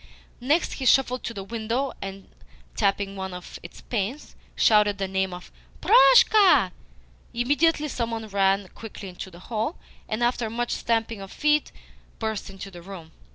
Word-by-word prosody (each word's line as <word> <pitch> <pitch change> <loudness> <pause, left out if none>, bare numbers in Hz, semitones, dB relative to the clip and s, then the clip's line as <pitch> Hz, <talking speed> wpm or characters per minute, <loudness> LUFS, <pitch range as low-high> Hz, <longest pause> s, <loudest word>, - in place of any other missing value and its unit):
Next, 290 +7 +1
he 260 - -3
shuffled 255 -1 +3
to - - -3
the 195 - -5
window, 230 +5 -2
and, 195 0 -7 0.5
tapping 200 -1 0
one 190 -1 -5
of 180 - -9
its 170 - -12
panes, 235 +6 -4 0.2
shouted 210 -2 +4
the 195 -1 -2
name 190 0 -1
of 180 0 -10 0.3
"Proshka." 440 -4 +6 0.6
Immediately 290 +5 +2
some 235 -3 -2
one 225 -1 -5
ran 195 -1 +1
quickly 210 -3 -9
into 180 +1 -8
the 170 - -14
hall, 225 - -3 0.3
and, 215 +2 -1
after 240 -2 0
much 240 +2 -3
stamping 225 -2 -1
of 195 - -9
feet, 300 0 +1 0.5
burst 220 -3 -3
into 195 0 -9
the 175 -2 -11
room. 170 -3 -10
220 Hz, 155 wpm, -25 LUFS, 195-245 Hz, 0.6 s, Proshka